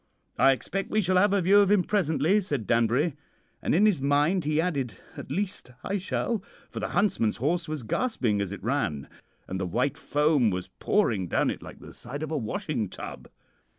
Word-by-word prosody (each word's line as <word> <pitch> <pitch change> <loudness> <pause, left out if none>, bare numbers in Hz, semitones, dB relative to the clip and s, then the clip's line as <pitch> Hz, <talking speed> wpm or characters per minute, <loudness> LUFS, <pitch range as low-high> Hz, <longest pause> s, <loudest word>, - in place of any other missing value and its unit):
"'I 135 - +6
expect 195 +9 -4
we'll 215 0 +1
have 200 +2 +4
a 200 -2 +2
view 200 +4 +6
of 200 -2 +4
him 205 -3 +4
presently,' 175 0 +2
said 145 - -3
Danbury; 120 - +2 0.5
and - - +1
in 200 +5 +5
his 195 -10 +3
mind 145 +5 +2
he 155 +1 +1
added, 140 - -1 0.2
'at - - -8
least, 185 -5 -3
I 200 - -1
shall,' 205 +3 -2 0.3
for - - -5
the - - -2
huntsman's 190 - +1
horse 165 +7 0
was 155 -4 -4
gasping 115 - 0
as 100 -2 -3
it 100 - -7
ran, 110 - -1 0.4
and 95 +1 -4
the 95 - -1
white 125 +10 -1
foam 145 -5 +2
was 90 -2 -4
pouring 110 - +1
down - - +1
it - - -7
like - - -11
the - - -11
side 140 +5 -7
of 155 - -4
a - - -1
washing 130 - -3
tub. - - -9
150 Hz, 195 wpm, -27 LUFS, 120-190 Hz, 0.5 s, I